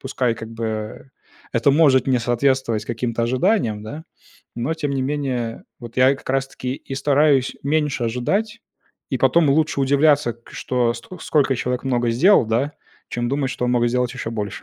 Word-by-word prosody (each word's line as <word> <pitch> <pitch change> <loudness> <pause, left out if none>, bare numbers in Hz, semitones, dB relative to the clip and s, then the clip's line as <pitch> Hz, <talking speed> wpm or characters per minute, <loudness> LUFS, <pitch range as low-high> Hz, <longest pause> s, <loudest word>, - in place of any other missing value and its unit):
пускай 125 -3 -1
как 110 0 -9
бы, 115 0 -5
э, 110 -1 -5 0.5
это 115 +3 +3
может 140 -4 +4
не 130 -2 +2
соответствовать 120 -1 0
каким-то 115 0 -2
ожиданиям, 125 - +1
да. 145 +9 -8 0.5
Но 125 +8 -1
тем 145 -3 -3
не 135 - -1
менее, 130 -5 -3 0.2
вот 120 -1 -10
я 130 +1 +5
и - - -3
как - - -13
раз-таки 135 -1 -2
и 135 - -8
стараюсь 140 -1 +2
меньше 145 -3 0
ожидать, 200 - -1 0.5
и - - -1
потом 165 -4 +4
лучше 150 0 +1
удивляться, 140 -2 +3
к 120 - -20
что 120 -2 0
ст 115 - -10
сколько 140 -5 +1
человек 125 +1 -2
много 120 -3 +1
сделал, 165 - +5
да, 120 +7 0 0.4
чем 120 0 -2
думать, 135 0 -1
что - - -3
он 125 - +1
мог 120 -1 +2
сделать 125 0 -1
еще 115 - -5
больше. 105 -3 -5
130 Hz, 180 wpm, -21 LUFS, 120-140 Hz, 0.5 s, я